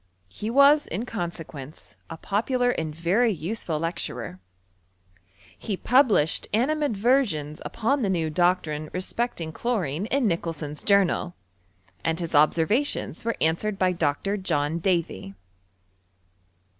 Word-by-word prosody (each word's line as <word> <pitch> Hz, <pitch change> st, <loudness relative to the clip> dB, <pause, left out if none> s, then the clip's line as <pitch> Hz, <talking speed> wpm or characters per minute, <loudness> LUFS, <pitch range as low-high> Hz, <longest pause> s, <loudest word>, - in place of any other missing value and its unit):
He 210 Hz, -, -5 dB
was, 280 Hz, +4 st, +5 dB
in 200 Hz, +9 st, -3 dB
consequence, 165 Hz, -, -7 dB, 0.2 s
a 165 Hz, -, -7 dB
popular 245 Hz, +7 st, 0 dB
and 155 Hz, -8 st, -3 dB
very 190 Hz, +9 st, +2 dB
useful 175 Hz, -2 st, -3 dB
lecturer. 125 Hz, -, -4 dB, 1.2 s
He 205 Hz, -4 st, -4 dB
published 230 Hz, -, +3 dB
animadversions 235 Hz, -, +1 dB
upon 270 Hz, +5 st, 0 dB
the 205 Hz, -, 0 dB
new 165 Hz, -4 st, 0 dB
doctrine 155 Hz, -3 st, +1 dB
Inspecting 185 Hz, -3 st, -2 dB
chlorine, 190 Hz, -, -2 dB
in 270 Hz, +1 st, +1 dB
Nicholson*s 165 Hz, -5 st, -2 dB
Journal; 195 Hz, -3 st, +2 dB, 0.7 s
and 160 Hz, -, 0 dB
bis 170 Hz, -2 st, -4 dB
observations 165 Hz, -, +2 dB
were 230 Hz, 0 st, -1 dB
answered 180 Hz, +6 st, +1 dB
by 185 Hz, -1 st, +2 dB
Dr. 170 Hz, +4 st, -1 dB
John 165 Hz, -4 st, 0 dB
Davy. 165 Hz, -, -1 dB
180 Hz, 110 wpm, -25 LUFS, 160-225 Hz, 1.2 s, was